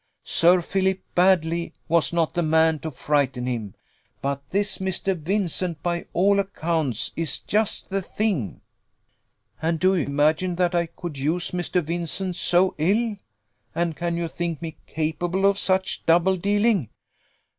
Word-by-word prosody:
Sir 175 +1 +4
Philip 190 +1 0
Baddely 170 -2 +2
was 170 -1 +2
not 170 -2 0
the 175 - 0
man 160 -1 +3
to 160 - -5
frighten 135 -3 0
him; 115 -6 -4 0.4
but 140 0 -2
this 205 +2 0
Mr. 190 0 -1
Vincent, 175 -2 -2
by 175 -1 -2
all 200 +3 +3
accounts, 160 - 0
is 165 -3 0
just 210 -1 -1
the 195 0 0
thing." 190 - -2 1.0
"And 165 0 0
do 185 +2 +4
you 165 - 0
imagine 155 +5 +1
that 180 0 +1
I 170 -1 +1
could 160 -3 -7
use 165 +6 -1
Mr. 180 0 -1
Vincent 170 +3 -3
so 180 +2 +2
ill? 210 +7 +1 0.6
And 170 -1 0
can 170 +1 -2
you 170 0 -1
think 170 -2 -3
me 160 -1 -7
capable 170 +4 -1
of 200 0 +3
such 190 -1 0
double 175 +3 +4
dealing?" 205 - +1
170 Hz, 145 wpm, -24 LUFS, 160-190 Hz, 1.0 s, Sir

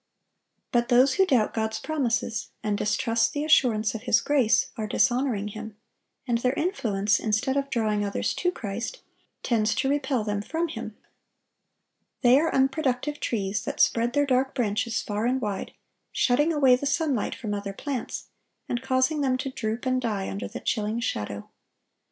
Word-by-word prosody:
But 240 0 +1
those 255 +2 +5
who 385 -1 +3
doubt 245 -9 +2
God's 220 -1 -1
promises, 235 -7 -1
and 210 -1 0
distrust 230 +3 +1
the 295 0 -2
assurance 230 -8 +3
of 225 - -5
His 235 -2 +3
grace, 270 -7 +2
are 215 -1 -3
dishonoring 240 -4 +1
Him; 215 0 -8 0.5
and 235 -1 +1
their 250 +2 +1
influence, 215 - 0
instead 220 +5 0
of 275 0 -1
drawing 215 -4 0
others 200 -1 -1
to 360 - 0
Christ, 230 - -5 0.4
tends 220 -3 +1
to 270 - 0
repel 270 -4 0
them 205 -1 -2
from 325 +9 -2
Him. - - -7 1.3
They 250 +2 +7
are 325 +1 +1
unproductive 270 +1 0
trees, 210 -2 -2
that - - -4
spread 235 +1 +3
their 290 0 +3
dark 265 0 +1
branches 230 -1 0
far 210 +2 -1
and 260 +1 +1
wide, 205 -5 -3 0.4
shutting 290 +6 +2
away 275 -5 +5
the 280 +3 -3
sunlight 280 -6 0
from 215 -5 -4
other 200 -1 -3
plants, 255 +4 -5 0.4
and 240 - -2
causing 265 +3 +1
them 260 -2 +1
to 260 +1 -4
droop 225 0 -3
and 255 0 +1
die 210 -5 -2
under 200 - -4
the - - -8
chilling 215 0 -1
shadow. 105 - -3
240 Hz, 165 wpm, -26 LUFS, 215-270 Hz, 1.3 s, They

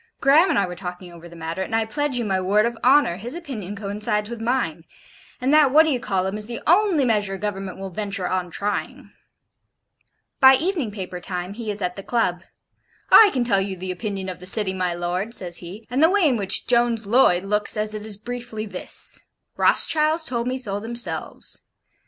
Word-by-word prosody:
Graham 300 +7 +5
and - - +1
I 200 - +2
were 180 -1 -7
talking 180 -1 -8
over 170 0 -12
the 170 - -14
matter, 165 +2 -5
and 190 - -3
I 225 0 +1
pledge 290 +3 -2
you 240 - -2
my 190 -2 0
word 205 +4 +2
of 235 0 -2
honour, 260 -9 +4
his 235 - -4
opinion 230 - -6
coincides 210 +1 -2
with 235 -1 -6
mine; 225 -10 -1 0.6
and 260 +3 0
that 305 -2 +6
What 305 +4 +6
d'ye 295 -6 0
call 190 -4 -1
um 195 +2 -3
is 210 - -4
the 235 -1 -5
only 350 -4 +3
measure 205 -4 0
Government 195 -2 -5
will 195 0 -7
venture 200 -1 -3
on 185 -1 -2
trying.' 205 +4 -4 1.3
By 265 -1 +8
evening 320 - -1
paper 185 -3 -7
time 180 +1 -5
he 225 0 -6
is 205 -1 -4
at 180 +1 -3
the - - -5
Club: 190 -5 -1 0.7
'I 435 - +9
can 255 - 0
tell 200 -5 +2
you 195 -1 -4
the 185 +1 -4
opinion 195 0 -4
of 185 -1 -6
the 180 - -5
City, 195 -1 +4
my 180 -2 -2
lord,' 180 +6 -2
says 175 -2 -1
he, 190 +6 -9
'and 260 +3 0
the 320 - +6
way 385 -3 +3
in 265 - +2
which 200 -3 +1
Jones 235 -2 +1
Loyd 200 -5 +3
looks 210 +2 +1
at 210 0 -1
it 215 - -5
is 215 -2 -5
briefly 240 -1 -6
this: 185 -4 -4 0.3
Rothschilds 315 +1 +3
told 240 -5 -3
me 255 +1 -2
so 205 -6 -2
themselves. 235 +2 -4
210 Hz, 205 wpm, -22 LUFS, 190-245 Hz, 1.3 s, I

